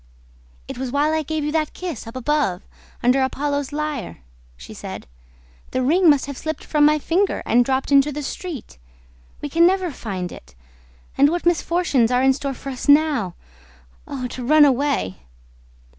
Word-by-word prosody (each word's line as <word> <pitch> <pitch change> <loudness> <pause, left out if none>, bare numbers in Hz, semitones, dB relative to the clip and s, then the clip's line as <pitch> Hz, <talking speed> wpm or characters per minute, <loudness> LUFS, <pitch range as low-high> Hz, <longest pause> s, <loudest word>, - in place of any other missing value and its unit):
"It - - -7
was 260 -2 -3
while 295 +3 +1
I 315 - +1
gave 310 0 -3
you 300 - -1
that 310 -1 -1
kiss, 340 - -6
up 230 - -9
above, 255 -8 0 0.4
under 250 +3 +3
Apollo's 285 +1 -1
lyre," 295 - -4 0.4
she - - -11
said. - - -8 0.6
"The 255 - -1
ring 335 +6 +4
must 285 -3 +4
have 280 -1 -7
slipped 315 0 -4
from 300 -1 +2
my 305 +1 +4
finger 350 +6 0
and 245 +1 +4
dropped 265 +2 -1
into 280 +1 +5
the 295 +1 -5
street! 285 - -7 0.6
We 290 - -4
can 335 +4 +5
never 370 -2 0
find 190 -8 -5
it. 60 0 -13 0.6
And 285 +1 +6
what 345 +2 -2
misfortunes 340 -7 +2
are 250 +1 +2
in 265 0 +5
store 275 0 -4
for 275 - -8
us 255 - -6
now! 285 - +3 0.7
Oh, 265 -3 -5
to 250 - -7
run 300 +4 +6
away!" 275 - 0
285 Hz, 175 wpm, -21 LUFS, 255-310 Hz, 0.7 s, And